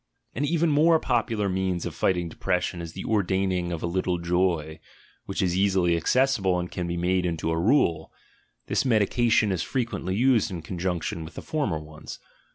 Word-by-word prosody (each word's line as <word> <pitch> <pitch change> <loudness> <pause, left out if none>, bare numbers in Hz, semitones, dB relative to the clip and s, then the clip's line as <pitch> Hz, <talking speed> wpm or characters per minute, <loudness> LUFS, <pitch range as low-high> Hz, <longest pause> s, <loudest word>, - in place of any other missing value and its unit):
An 140 - -2
even 165 +1 +1
more 160 +3 +4
popular 115 -5 0
means 95 -2 -1
of - - -4
fighting 90 -2 0
depression 90 +1 -2
is 85 -1 -7
die - - -6
ordaining 95 -4 0
of 85 - -4
a - - +1
little 90 +1 -1
joy, 85 -3 0 0.5
which 95 +1 -1
is 90 -1 0
easily 95 -3 +2
accessible 95 - +2
and 90 0 -4
can 90 -1 -3
be 85 0 -3
made 90 +1 +1
into 85 -2 -1
a 80 - 0
rule; 85 - +2 0.5
this - - 0
medication 115 -2 +2
is 90 -3 -1
frequently 110 -7 -2
used 120 -1 +3
in 85 -4 -6
conjunction 85 -1 -3
with 80 - -11
the - - -7
former 145 - -1
ones. 75 0 -10
95 Hz, 175 wpm, -26 LUFS, 85-110 Hz, 0.5 s, more